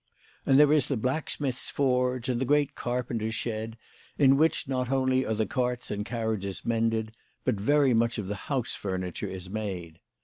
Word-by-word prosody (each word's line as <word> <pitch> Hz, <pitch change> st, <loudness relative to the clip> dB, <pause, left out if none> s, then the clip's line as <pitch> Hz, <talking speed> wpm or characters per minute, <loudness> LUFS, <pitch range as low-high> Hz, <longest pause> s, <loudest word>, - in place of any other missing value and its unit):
And 135 Hz, +1 st, +6 dB
there 150 Hz, 0 st, +6 dB
is 150 Hz, -4 st, +3 dB
the 135 Hz, -, 0 dB
blacksmith's 130 Hz, +1 st, -2 dB
forge, 125 Hz, -2 st, +1 dB
and 125 Hz, -1 st, 0 dB
the -, -, +1 dB
great 145 Hz, +1 st, +2 dB
carpenter's 120 Hz, -3 st, -2 dB
shed, 110 Hz, 0 st, -3 dB, 0.4 s
in 135 Hz, -2 st, +6 dB
which 160 Hz, +1 st, +2 dB
not 130 Hz, -2 st, -1 dB
only 130 Hz, -1 st, +2 dB
are 110 Hz, -, 0 dB
the 110 Hz, 0 st, +1 dB
carts 125 Hz, -1 st, -2 dB
and 105 Hz, 0 st, -2 dB
carriages 110 Hz, -4 st, -3 dB
mended, 115 Hz, -1 st, 0 dB, 0.3 s
but 130 Hz, -, +3 dB
very 140 Hz, +2 st, +4 dB
much 115 Hz, +1 st, +2 dB
of 105 Hz, -, -3 dB
the 100 Hz, -, -3 dB, 0.2 s
house 135 Hz, -4 st, -1 dB
furniture 95 Hz, -3 st, -3 dB
is 95 Hz, -1 st, -6 dB
made. 95 Hz, -5 st, -5 dB
120 Hz, 175 wpm, -28 LUFS, 110-130 Hz, 0.4 s, And